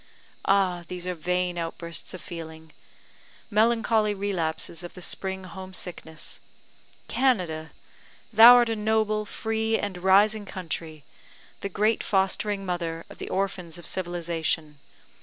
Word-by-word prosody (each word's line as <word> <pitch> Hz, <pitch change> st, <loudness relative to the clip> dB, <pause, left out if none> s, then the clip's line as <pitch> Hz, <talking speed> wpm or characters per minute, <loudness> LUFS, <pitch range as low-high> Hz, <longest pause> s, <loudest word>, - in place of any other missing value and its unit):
Ah, 190 Hz, -3 st, +2 dB
these 180 Hz, -1 st, -6 dB
are 180 Hz, -, -1 dB
vain 180 Hz, +1 st, -1 dB
outbursts 170 Hz, 0 st, -4 dB
of 185 Hz, -, -9 dB
feeling 160 Hz, -2 st, -9 dB, 0.8 s
melancholy 220 Hz, -1 st, +3 dB
relapses 170 Hz, -5 st, -2 dB
of 175 Hz, -, -9 dB
the 180 Hz, -, -9 dB
spring 190 Hz, +1 st, -3 dB
home 190 Hz, 0 st, -8 dB
sickness! 160 Hz, -4 st, -6 dB, 0.7 s
Canada! 180 Hz, -12 st, +1 dB, 0.6 s
thou 230 Hz, +3 st, +11 dB
art 240 Hz, -1 st, +5 dB
a 225 Hz, -, 0 dB
noble, 215 Hz, 0 st, +1 dB
free, 220 Hz, +1 st, 0 dB
and 195 Hz, -3 st, -4 dB
rising 205 Hz, +3 st, +4 dB
country 165 Hz, -4 st, -5 dB, 0.6 s
the 200 Hz, -, -4 dB
great 215 Hz, +3 st, +1 dB
fostering 195 Hz, +1 st, +1 dB
mother 170 Hz, -2 st, -3 dB
of -, -, -13 dB
the -, -, -5 dB
orphans 185 Hz, -4 st, -2 dB
of 175 Hz, -, -11 dB
civilisation. 165 Hz, -4 st, -2 dB
185 Hz, 125 wpm, -26 LUFS, 170-210 Hz, 0.8 s, thou